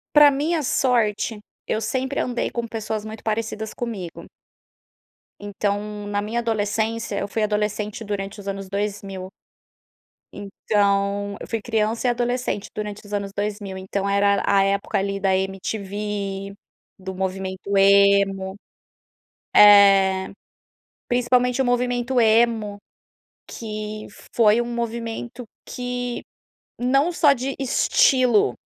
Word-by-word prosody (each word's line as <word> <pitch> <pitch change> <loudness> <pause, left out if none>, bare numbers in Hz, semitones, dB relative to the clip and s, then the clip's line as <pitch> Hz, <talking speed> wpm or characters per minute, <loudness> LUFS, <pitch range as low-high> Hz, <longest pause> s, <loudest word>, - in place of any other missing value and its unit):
Pra 295 -1 +8
minha 305 +3 0
sorte, 230 -5 +1 0.3
eu 220 - 0
sempre 265 +3 -2
andei 245 -1 -1
com 235 -1 -4
pessoas 220 -1 -4
muito 220 0 -8
parecidas 220 0 -3
comigo. 205 -8 -6 1.1
Então, 205 0 -3
na 205 0 -1
minha 220 +3 -2
adolescência, 225 0 -1
eu 200 - -3
fui 215 +2 -2
adolescente 210 +1 -2
durante 200 0 -5
os 200 - -10
anos 195 -1 -4
2000, 195 -2 -4 1.0
então, 200 0 0
eu - - -7
fui 225 - -2
criança 225 +1 -1
e - - +4
adolescente 245 -3 -2
durante 210 -1 -5
os 205 - -13
anos 200 -1 -3
2000, 205 -2 -3
então 195 +1 -3
era 200 0 +2
a 200 -1 +4
época 200 0 0
ali 195 0 -2
da 190 -1 +2
MTV, 195 0 -4 0.4
do 190 0 -7
movimento 190 +1 -3
Emo, 195 -1 +4 1.0
eh, 195 -2 +7 0.8
principalmente 250 +1 +2
o - - +3
movimento 245 0 +1
Emo 220 -2 +2 0.7
que 215 -1 -6 0.3
foi 225 0 +5
um - - -3
movimento 235 +1 -4 0.2
que, 245 -1 -4 0.6
não 275 +7 +2
só 300 -4 +4
de 265 +1 -4
estilo, 255 - +3
210 Hz, 115 wpm, -23 LUFS, 200-235 Hz, 1.1 s, Pra